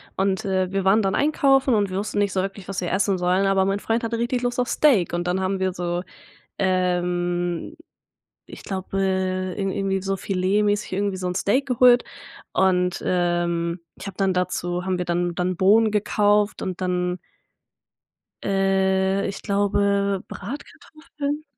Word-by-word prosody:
und, 190 0 0
äh, 190 -1 0
wir 195 -1 -1
waren 200 +3 +5
dann 195 -2 0
einkaufen 270 -3 +3
und 205 -3 +2
wir 185 - -3
wussten 205 +1 -2
nicht 200 -2 +1
so 190 - 0
wirklich, 195 0 -6
was 195 - -3
wir 180 - -2
essen 195 0 +1
sollen, 180 +2 +1
aber 195 -1 +3
mein 195 +1 0
Freund 230 +1 -1
hatte 230 0 -2
richtig 240 +1 -1
Lust 245 0 -2
auf 250 0 0
Steak 245 - +3
und 175 +1 -2
dann 185 +1 0
haben 190 0 -1
wir 185 -1 0
so, 175 0 -2 0.6
ähm, 175 - -1 0.7
ich - - -11
glaube, 195 0 -4
äh, 185 -1 -1
irgen 195 -1 -1
irgendwie 195 -1 -1
so 195 0 -2
Filetmäßig 205 +2 0
irgendwie 200 0 -1
so 185 -1 -3
'n 180 - -4
Steak 210 +8 +1
geholt 250 -1 +5 0.5
und, 180 -1 +1
ähm, 175 -1 0 0.2
ich - - -8
habe 190 - -8
dann 195 -1 +1
dazu 180 -1 -2
haben 185 -1 -1
wir 180 - -2
dann 175 0 -1
dann 180 +1 -1
Bohnen 215 +5 +4
gekauft 210 0 +1
und 185 0 -4
dann 180 0 -1 1.3
äh, 195 0 +1
ich 195 - -6
glaube 200 -1 +1
Bratkartoffeln. 295 +2 -6
190 Hz, 165 wpm, -23 LUFS, 180-205 Hz, 1.3 s, waren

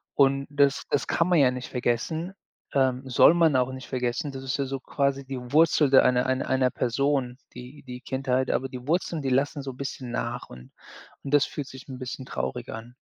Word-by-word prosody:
und 140 0 +3
das 140 -1 +2
das 145 - +1
kann 165 - +1
man 180 -1 +3
ja 130 -3 +5
nicht 125 0 -6
vergessen, 135 +9 -2 0.4
ähm, 130 -2 +1
soll 130 - +6
man 165 -4 +4
auch 125 0 +1
nicht 130 -1 -8
vergessen. 130 +3 -2
Das 135 -1 -7
ist 135 0 -2
ja 140 - -1
so 135 0 -4
quasi 140 +1 -1
die 135 0 -5 0.2
Wurzel 155 -2 +5
der 135 - +7
einer 125 0 +3
einer 130 0 -1
einer 130 -1 +2
Person, 125 0 0 0.2
die 125 +4 -11
die 125 -2 -9
Kindheit, 130 -1 -1
aber 135 +2 -1
die 125 0 -9
Wurzeln, 170 0 0
die 135 - -2
lassen 140 +3 +1
so 135 -1 -5
bisschen 130 -1 -6
nach 120 +1 -4
und 60 0 -13 0.5
und 140 - -6
das 145 -1 +5
fühlt 145 -3 -6
sich 130 -1 -11
'n 130 -1 -7
bisschen 130 0 -6
traurig 65 - -4
an. 115 +2 -8
130 Hz, 210 wpm, -26 LUFS, 125-140 Hz, 0.5 s, der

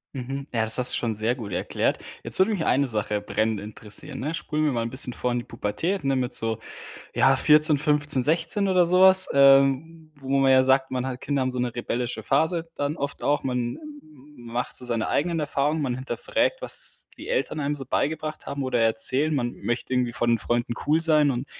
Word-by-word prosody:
Mhm. 135 +2 -5
Ja, 115 -2 0
das 110 0 +3
hast 125 - -2
du - - 0
schon 115 -2 -2
sehr 110 +3 -1
gut 110 -6 -8
erklärt. 90 - -1 0.2
Jetzt - - +2
würde 190 +4 +4
mich 190 -7 -2
eine 140 +1 +2
Sache 105 -2 -2
brennend 110 +1 -1
interessieren, 105 0 -7
ne? 150 +4 -3
Spulen 155 -1 -2
wir 150 - +2
mal 120 -3 -1
'n 115 - -4
bisschen 130 0 +2
vor 125 +1 -2
in 120 - -1
die 120 - -3
Pubertät, 145 - -3
ne, 135 -1 +1
mit 125 -1 -1
so, 115 -1 0 0.6
ja, 135 0 +4
14, 150 +1 +5
15, 150 -2 +1
16, 165 +7 +1
oder 185 -2 +4
sowas, 185 +2 +5
ähm, 140 +4 +3
wo 135 -2 -12
man 135 -1 +3
ja 130 - +6
sagt, 130 0 +2
man 130 0 -2
hat 125 -1 -6
Kinder 140 -2 -1
haben 130 - 0
so 125 - -5
'ne 120 -1 -2
rebellische 120 -1 -3
Phase, 160 - 0
dann 145 +2 -3
oft 140 0 -5
auch. 145 +1 0
Man 125 -2 -2
m-m 300 -2 -12 0.4
m 120 - -13
macht 125 +1 -3
so - - -9
seine 115 -2 -1
eigenen 170 +2 0
Erfahrungen. 150 +1 -1
Man 130 -3 -1
hinterfragt, 130 - -2
was - - +2
die - - -9
Eltern 485 - -1
einem 145 0 -1
so 140 -2 -7
beigebracht 155 +3 -3
haben 140 0 -4
oder 125 -2 -1
erzählen. 130 +7 +2
Man 120 -3 -1
möchte 120 +2 -4
irgendwie 125 -2 0
vor 120 - -1
den 115 -1 +2
Freunden 120 +1 -2
cool 150 +2 +3
sein 155 -3 +3
und 125 +2 -3
135 Hz, 220 wpm, -24 LUFS, 120-155 Hz, 0.6 s, ja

